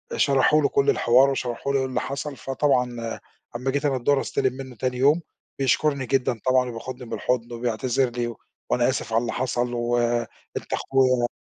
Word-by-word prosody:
شرحوا 140 +2 +4
له 140 - +2
كل 140 - +2
الحوار 125 +4 +5
وشرحوا 135 0 -2
له 135 - +3
إيه 130 - 0
اللي 130 -1 -2
حصل، 140 +1 -4
فطبعًا 125 -4 -1 0.4
لما 125 +3 -1
جيت 145 +1 -1
أنا 135 -2 +2
الضُهر 135 +2 +2
أستلِم 130 -1 0
منُّه 130 -1 -8
تاني 125 +1 -2
يوم 145 +6 +4 0.4
بيشكُرني 140 0 +1
جدًا 125 -2 0
طبعًا، 130 -1 +3
وبياخدني 125 +2 -7
بالحضن، 120 -1 -1
وبيعتذر 120 +2 0
لي: 120 -1 -3 0.3
"وأنا 120 0 +2
آسف 115 -3 -3
على 115 - +3
اللي 120 - -3
حصل 120 -1 -1
و 120 0 0 0.6
أنت - - -6
أخويا." 130 -2 +2
130 Hz, 175 wpm, -24 LUFS, 120-135 Hz, 0.6 s, الحوار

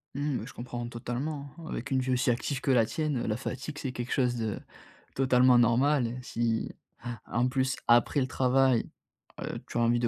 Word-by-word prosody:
Mmh, 145 -2 -1
bah, - - -5
je - - -10
comprends 120 0 -5
totalement, 130 +5 -4
hein. 165 - -10
Avec 145 - -4
une 135 -1 +2
vie 130 0 -1
aussi 125 0 +2
active 130 +3 -1
que - - -2
la 115 -3 +5
tienne, 150 +4 -1
heu, - - -2
la 105 - +1
fatigue, 130 +3 -5
c'est 130 - -3
quelque 120 0 -5
chose 125 -2 +2
de 110 -3 -2 0.6
totalement 130 -1 +5
normal 125 +2 +3
et 120 +2 -5
si 115 -2 -1 0.6
en 120 +2 +2
plus, 130 0 0
après 120 +4 +4
le 130 - 0
travail, 130 -1 +2 0.5
heu, - - -4
tu - - -5
as - - +3
envie 120 +1 +3
de 120 - +1
125 Hz, 210 wpm, -29 LUFS, 120-135 Hz, 0.6 s, la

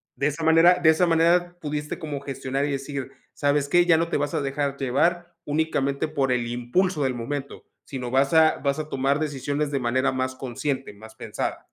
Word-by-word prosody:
de 140 - 0
esa 150 +2 -3
manera 165 +3 +5
de 160 - +5
esa 160 +3 +4
manera 175 +1 +2
pudiste 150 -1 -4
como 150 -3 -4
gestionar, 135 0 -3
y 145 - -2
decir: 135 -1 -4 0.2
"¿Sabes 145 0 +1
qué? 175 +3 +4
Ya 175 -2 +5
no 165 +1 0
te - - 0
vas 145 0 -2
a - - 0
dejar 140 0 -2
llevar 170 +6 0
únicamente 145 -1 0
por 140 -4 0
el 120 -1 0
impulso 140 +8 0
del 130 - 0
momento, 135 +4 -5 0.2
sino 125 -3 -5
vas 135 +3 +2
a 160 -1 +5
vas 140 +1 -1
a 155 0 -5
tomar 135 +1 0
decisiones 145 0 -2
de 140 -1 -1
manera 130 +2 +1
más 130 0 -2
consciente, 135 -1 -4
más 110 +2 -14
pensada". - - -5
145 Hz, 200 wpm, -24 LUFS, 135-160 Hz, 0.2 s, manera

